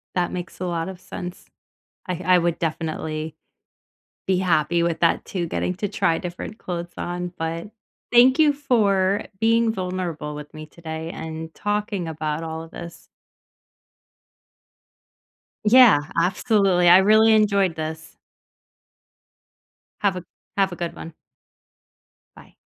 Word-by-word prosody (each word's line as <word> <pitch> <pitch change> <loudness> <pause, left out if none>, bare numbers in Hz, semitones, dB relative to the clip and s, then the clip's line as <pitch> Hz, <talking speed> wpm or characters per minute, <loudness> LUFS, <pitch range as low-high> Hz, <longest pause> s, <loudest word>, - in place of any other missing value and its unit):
That 180 -1 0
makes 175 -2 -6
a 185 - -3
lot 170 -1 -2
of 185 -2 -9
sense. 180 0 -8 0.6
I 180 -1 -3
I 185 0 +6
would 170 -1 0
definitely 155 -1 -3 0.9
be 190 -1 +2
happy 170 -2 +2
with 170 -1 -1
that 170 - +2
too 180 -3 -3
getting 180 +2 -2
to 205 +3 -2
try 165 -2 +1
different 180 +4 -6
clothes 175 -1 -5
on. 175 0 -4
But 165 +3 -4 0.4
thank 250 +4 +6
you 300 -2 +5
for 205 -8 +1
being 230 +1 +3
vulnerable 180 -6 -4
with 150 0 -9
me 155 0 -8
today 160 0 -7
and 160 0 -7
talking 205 -3 -2
about 155 0 -3
all 160 0 -5
of 165 - -13
this. 170 -1 -10 2.6
Yeah. 230 - +7
Absolutely. 185 +1 +2
I 180 +2 +9
really 215 +3 +5
enjoyed 200 -5 +3
this. 160 0 -6 1.9
Have 200 -3 +1
a 180 - -6 0.3
have 195 -1 +2
a - - -5
good 170 -1 -4
one. 165 - -9 1.2
Bye. - - -17
175 Hz, 130 wpm, -23 LUFS, 165-200 Hz, 2.6 s, I